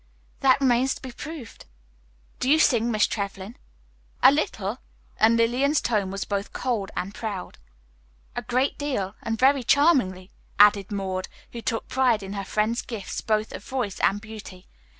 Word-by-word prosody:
"That 265 Hz, 0 st, +4 dB
remains 260 Hz, 0 st, +2 dB
to -, -, -12 dB
be 260 Hz, -, -6 dB
proved. 300 Hz, -2 st, -9 dB, 0.7 s
Do 255 Hz, -, 0 dB
you 305 Hz, -, +6 dB
sing, 240 Hz, -6 st, +3 dB
Miss 215 Hz, -2 st, +3 dB
Trevlyn?" 200 Hz, +1 st, -5 dB, 0.7 s
"A -, -, +9 dB
little." -, -, -2 dB, 0.4 s
And 225 Hz, +1 st, +5 dB
Lillian's 255 Hz, +6 st, +2 dB
tone 210 Hz, -5 st, 0 dB
was 195 Hz, +1 st, -4 dB
both 200 Hz, 0 st, -3 dB
cold 230 Hz, -6 st, -2 dB
and 195 Hz, +2 st, -3 dB
proud. 205 Hz, -, -6 dB, 0.8 s
"A -, -, -2 dB
great 255 Hz, +3 st, 0 dB
deal, 255 Hz, -10 st, -2 dB
and 225 Hz, 0 st, -2 dB
very 270 Hz, +3 st, +4 dB
charmingly," 240 Hz, -, +2 dB, 0.3 s
added 205 Hz, -1 st, +5 dB
Maud, 190 Hz, -2 st, -3 dB, 0.2 s
who 235 Hz, -, -7 dB
took 230 Hz, -2 st, -2 dB
pride 250 Hz, -5 st, +2 dB
in 195 Hz, +1 st, -6 dB
her 200 Hz, -1 st, -3 dB
friend's 215 Hz, +4 st, 0 dB
gifts 215 Hz, -6 st, -6 dB
both 215 Hz, 0 st, 0 dB
of -, -, -8 dB
voice 245 Hz, -7 st, -3 dB
and 200 Hz, -, +2 dB
beauty. 205 Hz, -4 st, -11 dB
225 Hz, 160 wpm, -25 LUFS, 200-255 Hz, 0.8 s, A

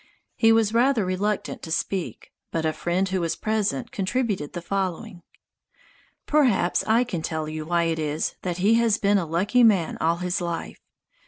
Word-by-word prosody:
He 225 Hz, -1 st, +4 dB
was 225 Hz, -1 st, +3 dB
rather 240 Hz, -2 st, +3 dB
reluctant 195 Hz, +3 st, -2 dB
to 160 Hz, -, -8 dB
speak, 185 Hz, +2 st, -3 dB, 0.2 s
but 165 Hz, -1 st, -2 dB
a 155 Hz, -, +1 dB
friend 180 Hz, +4 st, -1 dB
who 185 Hz, -1 st, -1 dB
was 165 Hz, -1 st, -1 dB
present 210 Hz, -11 st, -1 dB
contributed 200 Hz, -, -2 dB
the 175 Hz, -, -4 dB
following: 190 Hz, +1 st, -3 dB, 1.0 s
"Perhaps 255 Hz, -12 st, +2 dB
I 225 Hz, +3 st, +4 dB
can 190 Hz, -9 st, -4 dB
tell 155 Hz, -1 st, -3 dB
you 155 Hz, 0 st, -5 dB
why 170 Hz, 0 st, +2 dB
it 165 Hz, -1 st, -1 dB
is 155 Hz, 0 st, -2 dB
that 175 Hz, -2 st, -3 dB
he 200 Hz, +5 st, +3 dB
has 225 Hz, -2 st, +2 dB
been 200 Hz, -1 st, +2 dB
a 170 Hz, -, -3 dB
lucky 195 Hz, +10 st, +2 dB
man 195 Hz, -8 st, +3 dB
all 165 Hz, +1 st, +2 dB
his 180 Hz, +1 st, -2 dB
life. 170 Hz, -1 st, -5 dB
185 Hz, 175 wpm, -24 LUFS, 170-215 Hz, 1.0 s, He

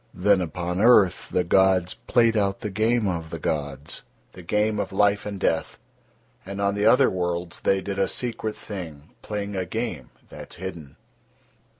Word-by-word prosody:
Then 95 Hz, +1 st, +3 dB
upon 90 Hz, +2 st, -3 dB
earth 105 Hz, -6 st, +5 dB
the 90 Hz, -, +1 dB
gods 95 Hz, 0 st, +3 dB
played 115 Hz, -1 st, +2 dB
out 100 Hz, -2 st, 0 dB
the 105 Hz, -, -4 dB
game 110 Hz, +2 st, +1 dB
of 85 Hz, -3 st, -3 dB
the -, -, -5 dB
gods, 70 Hz, -2 st, -3 dB, 0.3 s
the 90 Hz, -, -12 dB
game 105 Hz, +4 st, 0 dB
of -, -, -2 dB
life 100 Hz, +1 st, +2 dB
and 100 Hz, -2 st, -5 dB
death, 80 Hz, -3 st, 0 dB, 0.7 s
and 100 Hz, +1 st, -7 dB
on 100 Hz, 0 st, +1 dB
the 105 Hz, +1 st, +1 dB
other 130 Hz, +3 st, +6 dB
worlds 90 Hz, -1 st, -3 dB
They 95 Hz, 0 st, +2 dB
did 100 Hz, 0 st, -4 dB
a 95 Hz, -, +3 dB
secret 115 Hz, -3 st, -3 dB
thing, 90 Hz, -9 st, -8 dB
playing 105 Hz, -1 st, -4 dB
a 95 Hz, -, -1 dB
game 90 Hz, -, -4 dB, 0.2 s
that -, -, -9 dB
is 90 Hz, -, -11 dB
hidden. 85 Hz, -7 st, -7 dB
95 Hz, 175 wpm, -24 LUFS, 90-105 Hz, 0.7 s, other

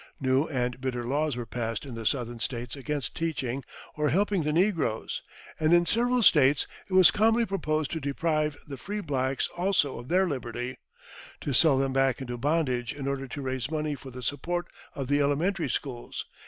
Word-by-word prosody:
New 135 Hz, +2 st, +2 dB
and 125 Hz, -3 st, -2 dB
bitter 125 Hz, -2 st, -2 dB
laws 145 Hz, +2 st, 0 dB
were 120 Hz, -, -3 dB
passed 115 Hz, +1 st, -3 dB
in 135 Hz, -, -7 dB
the 115 Hz, -2 st, -3 dB
Southern 120 Hz, -2 st, -1 dB
States 120 Hz, +2 st, -3 dB
against 145 Hz, -1 st, -3 dB
teaching 140 Hz, -5 st, -2 dB, 0.3 s
or 150 Hz, -1 st, +1 dB
helping 195 Hz, +4 st, +2 dB
the 150 Hz, 0 st, 0 dB
negroes; 165 Hz, -, +1 dB, 0.4 s
and 155 Hz, +1 st, +3 dB
in 175 Hz, 0 st, +4 dB
several 240 Hz, +6 st, +2 dB
States 145 Hz, -6 st, +5 dB, 0.2 s
it -, -, -6 dB
was 185 Hz, -2 st, +8 dB
calmly 225 Hz, +2 st, +3 dB
proposed 155 Hz, -7 st, -1 dB
to 160 Hz, -, -2 dB
deprive 150 Hz, +1 st, 0 dB
the 140 Hz, -2 st, -7 dB
free 205 Hz, -, -4 dB
blacks 135 Hz, -6 st, 0 dB
also 175 Hz, -8 st, +1 dB
of 120 Hz, -, -9 dB
their 185 Hz, +4 st, +3 dB
liberty, 125 Hz, -3 st, -4 dB, 0.6 s
to 140 Hz, -, -2 dB
sell 140 Hz, +1 st, +5 dB
them 135 Hz, 0 st, +1 dB
back 135 Hz, -2 st, +2 dB
into 120 Hz, -2 st, -4 dB
bondage 130 Hz, -3 st, 0 dB
in 140 Hz, -1 st, -4 dB
order 135 Hz, -1 st, -2 dB
to 140 Hz, +2 st, -6 dB
raise 130 Hz, 0 st, -2 dB
money 155 Hz, -1 st, -1 dB
for 135 Hz, -1 st, -8 dB
the 125 Hz, 0 st, -9 dB
support 170 Hz, +8 st, -2 dB, 0.3 s
of 135 Hz, -2 st, -3 dB
the 145 Hz, +1 st, +3 dB
elementary 160 Hz, +6 st, +1 dB
schools. 125 Hz, -4 st, -4 dB
140 Hz, 185 wpm, -28 LUFS, 130-165 Hz, 0.6 s, was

